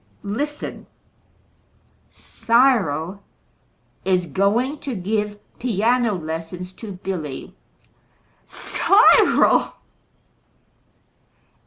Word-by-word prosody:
Listen; 290 +9 -5 1.2
Cyril 200 - +1 0.8
is 185 -2 +1
going 210 - 0
to 270 -4 -5
give 210 +2 -2 0.2
piano 235 0 +1
lessons 165 +2 -6
to 210 0 -8
Billy! 180 -7 -6 0.9
CYRIL!" - - +4
200 Hz, 55 wpm, -21 LUFS, 180-235 Hz, 1.2 s, CYRIL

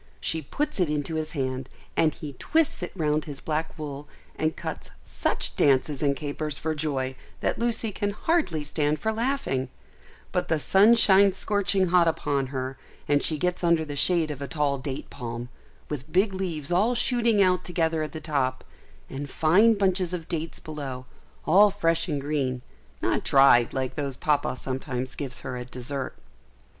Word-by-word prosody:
She 160 - -1
puts 295 - -3
it 180 -4 +2
into 150 +1 -2
his 155 -1 -3
hand, 130 -3 -3 0.3
and 160 -1 +3
he 150 0 -7
twists 310 - 0
it 175 - -4
round 155 -3 0
his 145 -3 -7
black 155 +1 -3
wool, 145 -1 -6 0.3
and 155 0 -1
cuts - - -6
such - - 0
dances 140 +1 +2
and 140 -2 +2
capers 150 0 -3
for 160 +4 -2
joy 135 -4 -2 0.3
that - - -1
Lucy 230 -2 0
can 205 0 -2
hardly 205 - 0
stand 150 +1 0
for 220 +9 -1
laughing; 225 - -1 0.6
but - - -1
the 160 - +1
sun 200 +9 +5
shines 195 -3 +5
scorching 200 -3 +1
hot 175 -1 +4
upon 140 -4 0
her, 130 0 -5 0.3
and 145 -1 +3
she 155 - +3
gets 180 +3 -1
under 170 -2 +3
the 145 -1 -6
shade 155 +2 +3
of 140 -1 -7
a 140 - -3
tall 145 -3 0
date 135 0 -6
palm, 120 -1 -6 0.4
with 150 0 -6
big 190 +3 +2
leaves 175 -6 -3
all 210 +8 +3
shooting 235 -3 +3
out 185 -2 +3
together 165 -2 0
at 155 - -3
the 160 - -6
top, 140 -5 -1 0.4
and 140 +1 -6
fine 200 +11 +4
bunches 185 -3 +1
of 165 -2 -7
dates 165 0 -3
below, 140 -5 -6 0.4
all 200 +5 +6
fresh 165 -4 0
and 145 -4 -2
green, 135 -4 -2 0.4
not - - +1
dried 135 -4 +5
like 130 -1 -2
those 140 -4 -4
Papa 145 -3 +1
sometimes 130 -1 -4
gives 130 -2 -5
her 130 -1 -5
at 125 0 -7
dessert. 130 +2 -4
155 Hz, 175 wpm, -26 LUFS, 140-180 Hz, 0.6 s, all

